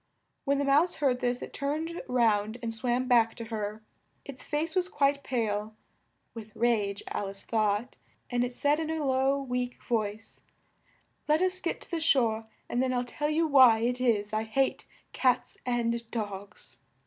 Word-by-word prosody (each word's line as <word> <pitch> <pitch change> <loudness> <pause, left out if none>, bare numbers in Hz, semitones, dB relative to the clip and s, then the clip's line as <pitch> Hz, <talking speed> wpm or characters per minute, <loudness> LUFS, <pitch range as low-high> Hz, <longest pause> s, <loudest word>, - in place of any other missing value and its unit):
When 280 0 +2
the 285 - +1
Mouse 290 +6 +3
heard 265 -4 +1
this 245 0 -1
it - - -9
turned 310 +4 -3
round 220 -3 +2
and 225 -1 -2
swam 245 +3 -1
back 230 -3 +4
to 230 - -6
her; 215 -1 -4 0.4
its 275 -2 -8
face 305 +2 -2
was 370 -1 +1
quite 280 -2 +1
pale 215 -3 -2 0.6
(with 220 -2 -10
rage, 210 -4 +1
Al 200 - -3
ice 195 0 -10
thought), 215 +2 0 0.3
and 245 -1 0
it 245 - -2
said 290 +4 +1
in 320 -1 -2
a 320 -2 -1
low, 265 +1 +2
weak 250 -2 -3
voice, 220 -1 -3 0.9
"Let 310 +4 +3
us 370 0 +1
get 335 - -2
to - - -13
the 335 - -1
shore, 230 -8 +2 0.2
and 240 - 0
then 260 -1 +1
I'll 245 0 0
tell 295 +4 -3
you 320 +2 +2
why 260 -7 +6
it 245 +2 0
is 215 -4 +1
I 215 - +1
hate 240 +5 0 0.3
cats 255 -2 +1
and 235 -1 -1
dogs." 205 -3 -6
245 Hz, 175 wpm, -29 LUFS, 220-280 Hz, 0.9 s, why